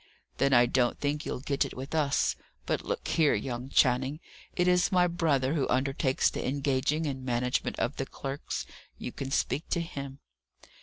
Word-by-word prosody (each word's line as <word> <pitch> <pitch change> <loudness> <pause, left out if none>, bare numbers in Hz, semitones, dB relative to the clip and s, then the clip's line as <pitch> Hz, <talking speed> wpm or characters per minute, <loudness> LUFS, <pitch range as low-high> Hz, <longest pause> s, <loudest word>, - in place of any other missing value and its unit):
"Then 140 - +3
I 120 -2 +7
don't 120 0 +1
think 145 +1 -1
you'll - - -3
get 140 0 +1
it - - -7
with 135 +4 -6
us. 145 -3 +2 0.3
But - - -1
look - - -3
here, 155 -3 +3
young 120 +4 -4
Channing, 130 +3 +3 0.4
it 180 - +2
is 180 0 +3
my 180 -1 +5
brother 155 -6 +1
who 145 -5 +1
undertakes 130 +1 +2
the - - -3
engaging 140 +3 0
and 135 -3 -3
management 125 0 -1
of 120 - -1
the 135 - -2
clerks 135 +1 -5 0.3
you - - -5
can 135 - -5
speak 145 +3 -1
to 170 - +1
him." 140 -5 -6
135 Hz, 175 wpm, -29 LUFS, 130-150 Hz, 0.4 s, I